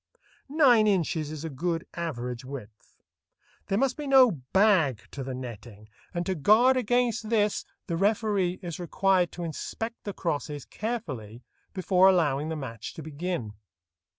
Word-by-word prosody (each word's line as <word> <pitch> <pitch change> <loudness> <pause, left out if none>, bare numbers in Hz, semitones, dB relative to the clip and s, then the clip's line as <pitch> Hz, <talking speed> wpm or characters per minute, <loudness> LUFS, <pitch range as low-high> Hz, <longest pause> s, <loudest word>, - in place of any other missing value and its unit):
Nine 260 -8 +5
inches 165 -6 +1
is 155 0 -6
a - - -3
good 165 +4 -2
average 125 -7 -4
width. 125 -6 -10 0.7
There 195 - 0
must 265 +2 +1
be 295 -1 -5
no 265 -3 +7
"bag" 160 - +2
to 140 - -5
the 130 0 -5
netting, 115 -4 -9 0.2
and 175 0 -3
to 190 - 0
guard 220 - +5
against 245 -2 +1
this 210 -3 +1 0.2
the 170 - -2
referee 200 -2 +1
is 170 -1 -5
required 180 +1 +1
to 175 - -6
inspect 225 +8 -5
the 205 - -4
crosses 150 -4 -3
carefully 130 - -5 0.3
before 185 -1 +3
allowing 155 -5 +2
the 160 - -2
match 115 -7 -7
to 160 - -7
begin. 155 - -4
175 Hz, 150 wpm, -27 LUFS, 140-210 Hz, 0.7 s, no